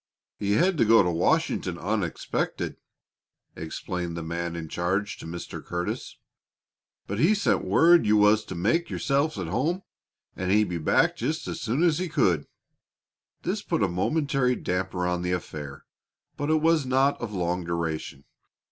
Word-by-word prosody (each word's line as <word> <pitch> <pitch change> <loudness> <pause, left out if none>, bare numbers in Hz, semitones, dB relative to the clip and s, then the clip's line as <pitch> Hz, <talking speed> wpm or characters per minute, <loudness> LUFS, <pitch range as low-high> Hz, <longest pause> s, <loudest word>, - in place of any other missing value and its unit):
"He 100 0 0
had 175 - +2
to - - +6
go 115 +1 +6
to 90 - 0
Washington 85 +1 +1
unexpected," 95 -1 -2 0.8
explained 85 +2 -4
the 85 - -4
man 85 +1 -3
in 85 -1 -5
charge 95 +5 -1
to - - -8
Mr. 85 +1 -7
Curtis. 90 0 -4 0.9
"But 100 +2 -4
he 180 - +4
sent 205 - +1
word 170 -6 +5
you 105 0 +5
was 105 +1 +5
to - - -7
make 165 - +1
yourselves 140 0 0
at 95 - -3
home, 160 - -1 0.5
and 90 0 -3
he'd 105 0 +3
be 85 -1 -3
back 75 - +3
just - - -2
as - - -5
soon 130 +9 0
as 165 -3 +3
he 185 -1 -2
could." 95 - +1 1.0
This - - -1
put - - 0
a - - +3
momentary 135 - +1
damper 90 -2 -2
on 90 0 0
the 90 0 -1
affair, 75 -5 -6 0.5
but 145 +1 -3
it 155 0 +2
was 165 -2 +4
not 135 +2 +2
of 120 -3 -4
long 90 -2 -1
duration. 80 -4 -3
100 Hz, 165 wpm, -26 LUFS, 85-140 Hz, 1.0 s, to